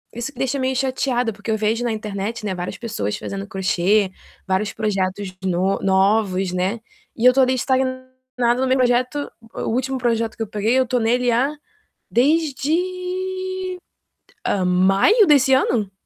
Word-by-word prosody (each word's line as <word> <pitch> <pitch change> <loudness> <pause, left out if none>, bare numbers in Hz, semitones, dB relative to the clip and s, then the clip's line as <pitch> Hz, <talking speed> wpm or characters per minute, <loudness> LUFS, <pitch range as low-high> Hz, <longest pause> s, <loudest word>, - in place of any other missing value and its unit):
isso 240 +5 -4
me - - -14
deixa 265 +1 0
meio 260 0 0
chateada, 255 -3 0
porque 210 +2 -5
eu 220 - +1
vejo 220 +3 0
na 240 - 0
internet, 215 +1 -4
né, 190 -2 -2
várias 180 +2 -5
pessoas 155 - -3
fazendo 195 0 -5
crochê, 190 0 +1 0.4
vários 195 +2 0
projetos 195 -3 -2
no 185 +1 +1
novos, 190 -1 +2
né, 190 +5 -1 0.4
e 230 - 0
eu 250 - +9
estou 265 +1 +4
ali 255 +1 +2
estagnada 260 0 0 0.6
no 265 - +1
meu 260 +1 +3
projeto, 255 +3 +1 0.3
o - - -4
último 260 +3 -1
projeto 230 -2 -1
que 225 - -2
eu - - -6
peguei 215 +5 0
eu 260 - +3
estou 250 0 0
nele 245 +2 +2
há 265 +6 +1 0.6
desde 365 +6 -1 0.9
maio 195 - +4
desse 275 -3 +5
ano? 230 -6 +2
235 Hz, 155 wpm, -21 LUFS, 200-265 Hz, 0.9 s, eu